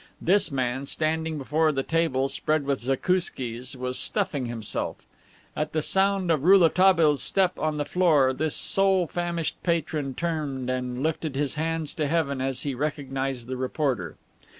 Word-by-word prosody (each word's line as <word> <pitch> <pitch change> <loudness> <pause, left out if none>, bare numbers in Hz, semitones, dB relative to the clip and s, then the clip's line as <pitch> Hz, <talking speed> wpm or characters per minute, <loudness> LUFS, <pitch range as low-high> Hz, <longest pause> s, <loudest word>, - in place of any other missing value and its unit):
This 195 0 +2
man, 130 0 -2
standing 160 +1 -1
before 150 +4 +1
the 135 -2 -2
table 160 -5 0
spread 150 +2 -1
with 140 -1 0
zakouskis, 130 -3 -1
was 125 0 -1
stuffing 135 -4 +1
himself. 115 -3 -3 0.5
At 150 0 -3
the 155 -1 0
sound 195 -1 +2
of 150 -4 +1
Rouletabille's 170 -4 +5
step 185 -2 +1
on 155 0 -1
the 145 - -1
floor 150 -8 +3
this 155 +3 -1
sole 195 -2 +3
famished 170 0 -3
patron 155 -5 -1
turned 145 -7 -3
and 125 0 -3
lifted 155 -2 -2
his 140 -1 0
hands 160 0 -2
to 150 -2 -1
heaven 140 -4 0
as 135 0 -1
he 140 - -2
recognized 135 -3 -3
the 130 0 -4
reporter. 130 - -2
150 Hz, 150 wpm, -25 LUFS, 130-165 Hz, 0.5 s, Rouletabille's